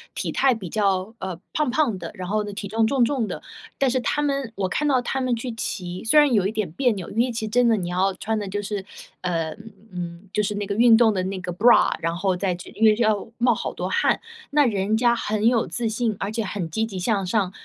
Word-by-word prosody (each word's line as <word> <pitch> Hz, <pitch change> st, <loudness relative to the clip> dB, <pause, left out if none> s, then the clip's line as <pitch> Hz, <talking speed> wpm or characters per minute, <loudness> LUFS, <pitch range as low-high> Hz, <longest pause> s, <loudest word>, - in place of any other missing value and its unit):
体 -, -, -2 dB
态 270 Hz, -1 st, +3 dB
比 190 Hz, -6 st, -7 dB
较， 195 Hz, -1 st, 0 dB
呃， 185 Hz, -3 st, -4 dB, 0.2 s
胖 300 Hz, -4 st, +1 dB
胖 245 Hz, -7 st, +1 dB
的， 165 Hz, -, -6 dB
然 185 Hz, -3 st, -6 dB
后 210 Hz, +2 st, 0 dB
呢 205 Hz, -, -6 dB
体 200 Hz, 0 st, -5 dB
重， 220 Hz, +2 st, +1 dB
重 265 Hz, 0 st, +2 dB
重 250 Hz, -4 st, -1 dB
的。 -, -, -5 dB, 0.4 s
但 275 Hz, -, +2 dB
是 255 Hz, +1 st, +1 dB
他 295 Hz, +4 st, 0 dB
们 275 Hz, -5 st, -1 dB
我 190 Hz, -1 st, -1 dB
看 300 Hz, +9 st, 0 dB
到 260 Hz, -3 st, +3 dB
他 265 Hz, +2 st, -2 dB
们 250 Hz, -2 st, +1 dB
去 240 Hz, +2 st, -5 dB
骑， 185 Hz, -5 st, -5 dB
虽 265 Hz, +7 st, +3 dB
然 295 Hz, -3 st, +5 dB
有 195 Hz, -3 st, +3 dB
一 -, -, -2 dB
点 210 Hz, -7 st, -2 dB
别 250 Hz, +6 st, +2 dB
扭， 185 Hz, -4 st, -6 dB
因 220 Hz, -, -9 dB
为 245 Hz, +1 st, +2 dB
其 225 Hz, -1 st, -3 dB
实 -, -, -5 dB
真 245 Hz, +2 st, +3 dB
的 230 Hz, -, +4 dB
你 175 Hz, -3 st, -3 dB
要 185 Hz, +2 st, +1 dB
穿 220 Hz, +1 st, -2 dB
的 205 Hz, -, -4 dB
就 205 Hz, +2 st, -3 dB
是 205 Hz, -1 st, -4 dB, 0.4 s
呃， 165 Hz, -3 st, -1 dB, 0.4 s
嗯， 175 Hz, +1 st, -7 dB
就 210 Hz, -, +2 dB
是 210 Hz, 0 st, -2 dB
那 205 Hz, -, -2 dB
个 200 Hz, -, -2 dB
运 230 Hz, +1 st, +6 dB
动 225 Hz, -2 st, +4 dB
的 185 Hz, -, -1 dB
那 190 Hz, 0 st, -3 dB
个 180 Hz, -1 st, -4 dB
bra， 230 Hz, +7 st, +5 dB
然 165 Hz, 0 st, -1 dB
后 185 Hz, +1 st, 0 dB
再 185 Hz, -2 st, 0 dB
去 175 Hz, -, -10 dB
因 225 Hz, -, +1 dB
为 215 Hz, -1 st, +6 dB
要 215 Hz, -2 st, +1 dB
冒 245 Hz, 0 st, +3 dB
好 -, -, -4 dB
多 -, -, -4 dB
汗。 -, -, +2 dB, 0.3 s
那 295 Hz, 0 st, +4 dB
人 210 Hz, -2 st, +1 dB
家 235 Hz, +1 st, +3 dB
很 215 Hz, -1 st, 0 dB
有 235 Hz, -2 st, +2 dB
自 235 Hz, -2 st, -2 dB
信， 225 Hz, 0 st, -1 dB
而 200 Hz, +2 st, -2 dB
且 225 Hz, 0 st, -2 dB
很 185 Hz, -3 st, -4 dB
积 220 Hz, +7 st, -1 dB
极 195 Hz, -4 st, -7 dB
向 195 Hz, 0 st, 0 dB
上 185 Hz, 0 st, 0 dB
215 Hz, 290 characters per minute, -23 LUFS, 190-235 Hz, 0.4 s, 运